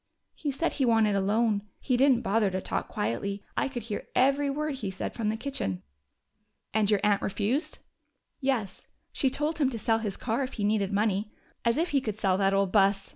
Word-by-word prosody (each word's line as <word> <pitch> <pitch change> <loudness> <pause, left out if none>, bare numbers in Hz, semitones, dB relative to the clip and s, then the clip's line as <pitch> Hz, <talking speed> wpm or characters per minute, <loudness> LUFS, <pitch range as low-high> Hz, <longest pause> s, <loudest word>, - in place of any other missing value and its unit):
"He 295 - -4
said 285 +5 -1
he 275 - 0
wanted 225 -3 +3
a 195 - +2
loan. 210 +1 +2 0.2
He 255 - 0
didn't 255 -1 +4
bother 215 -1 +2
to 185 0 -2
talk - - -3
quietly: 195 - -2
I - - +1
could 250 -4 -5
hear 215 -2 -5
every 275 +2 +3
word 295 0 -2
he 210 -6 -3
said 190 - -4
from 220 -3 -1
the 220 - -1
kitchen." 160 - -3 0.9
"And 215 -1 +2
your 210 -2 +3
aunt 205 -1 +3
refused?" 225 - -1 0.6
"Yes. 255 -8 -2 0.2
She 270 - +1
told 300 +4 -1
him 275 -4 +3
to 240 - -4
sell 225 +1 +1
his 210 -3 -3
car 230 +2 -1
if 260 0 -3
he 210 - -3
needed 205 -1 +1
money. 205 0 0 0.3
As 235 +1 +2
if 335 +3 +1
he 280 -2 +2
could 215 -5 -4
sell 195 -3 +2
that 195 -1 +3
old 195 -1 +2
bus!" 195 -1 +3
220 Hz, 210 wpm, -28 LUFS, 200-265 Hz, 0.9 s, didn't